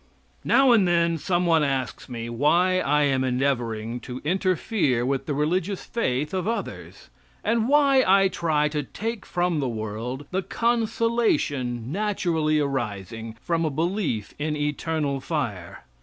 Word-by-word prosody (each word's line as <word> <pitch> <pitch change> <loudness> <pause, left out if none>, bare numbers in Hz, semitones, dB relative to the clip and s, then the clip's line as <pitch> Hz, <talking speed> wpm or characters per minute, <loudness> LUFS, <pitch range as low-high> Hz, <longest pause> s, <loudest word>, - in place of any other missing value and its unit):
Now 270 -1 +5
and 210 -6 +5
then 170 -1 +2
some 175 +4 0
one 165 -2 +4
asks 135 -3 -2
me 115 -2 -5
why 170 +10 +2
I 150 -3 +2
am 135 -2 +2
endeavoring 120 -3 -1
to 125 +1 -7
interfere 180 - +1
with 135 0 -1
the 145 - -1
religious 175 +6 -1
faith 150 - -1
of 185 0 -1
others, 100 - -5 0.3
and 230 +2 +1
why 280 -2 +5
I 195 +1 +5
try 160 -5 +1
to 150 0 -2
take 220 - -5
from 175 -2 0
the 135 -3 -1
world 115 +5 -5
the 190 +1 0
consolation 220 - 0
naturally 170 -6 0
arising 115 -5 -3
from 170 -1 0
a 160 - +1
belief 160 - -2
in 150 +1 -1
eternal 150 -1 -1
fire. 115 - -4
150 Hz, 140 wpm, -25 LUFS, 130-185 Hz, 0.3 s, Now